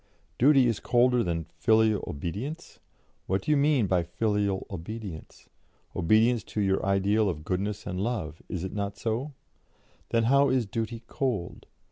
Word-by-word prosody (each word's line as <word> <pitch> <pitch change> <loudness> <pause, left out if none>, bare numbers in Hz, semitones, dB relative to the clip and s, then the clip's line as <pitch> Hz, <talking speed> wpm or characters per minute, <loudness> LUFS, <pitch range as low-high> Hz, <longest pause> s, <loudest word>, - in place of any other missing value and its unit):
Duty 135 0 +6
is 115 -3 +1
colder 125 0 +3
than 85 -2 -2
'filial 110 -2 +3
obedience'? 105 - -5 0.5
What 95 +1 0
do - - 0
you - - +5
mean 140 -4 +3
by 90 -2 +2
filial 100 +2 -1
obedience? 95 -1 -8 0.5
Obedience 110 +7 +3
to - - -5
your 95 -1 +1
ideal 100 +2 +2
of 75 -4 -4
goodness 100 +3 -2
and 90 - -4
love 100 -9 -3
is 90 -2 -3
it 95 - -5
not 100 -1 -3
so? 120 +6 -2 0.8
Then 115 -1 +2
how 140 +4 +4
is 130 -2 +2
duty 115 +1 -4
cold? 115 -11 -3
110 Hz, 150 wpm, -27 LUFS, 95-120 Hz, 0.8 s, Duty